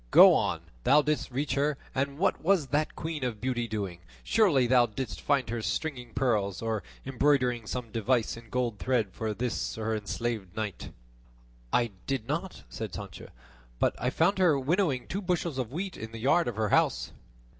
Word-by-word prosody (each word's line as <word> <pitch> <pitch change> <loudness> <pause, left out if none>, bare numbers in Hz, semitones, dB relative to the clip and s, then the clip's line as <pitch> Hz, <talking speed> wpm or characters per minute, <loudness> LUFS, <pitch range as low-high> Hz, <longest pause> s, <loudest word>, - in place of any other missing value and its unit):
"Go - - +9
on; - - +1 0.2
thou 145 +2 +5
didst 150 0 -1
reach 135 +2 -1
her; 140 +1 +1 0.2
and 140 +1 -1
what 195 - +1
was 170 -6 +2
that 150 +3 0
queen 160 -3 -4
of 120 -4 -2
beauty 120 0 -1
doing? 100 -5 -4 0.2
Surely 185 - +4
thou 120 0 +5
didst 110 -1 -5
find 140 -3 +1
her 120 -1 -2
stringing 125 -2 -3
pearls, 105 -7 +1
or 110 -2 -1 0.2
embroidering 130 -4 +2
some 120 -2 -4
device 115 +1 +1
in 115 -1 -13
gold 120 -3 -1
thread 120 -6 +1
for 110 -1 -3
this 125 +1 -2
her 110 0 -1
enslaved 105 -2 -3
knight." 105 -4 -4 0.8
"I 120 -2 +2 0.2
did 135 -5 -2
not," 170 +6 -3
said 110 -3 -6
Sancho, 100 -4 -8 0.5
"but - - +1
I 125 - +1
found 175 +8 +2
her 165 -7 +4
winnowing 145 -2 +1
two 195 - -3
bushels 175 -6 -1
of 125 -2 -3
wheat 185 +5 -4
in 110 0 -7
the - - -6
yard 140 +9 +3
of 120 - -2
her 110 -1 0
house." - - +2
125 Hz, 180 wpm, -29 LUFS, 110-145 Hz, 0.8 s, Go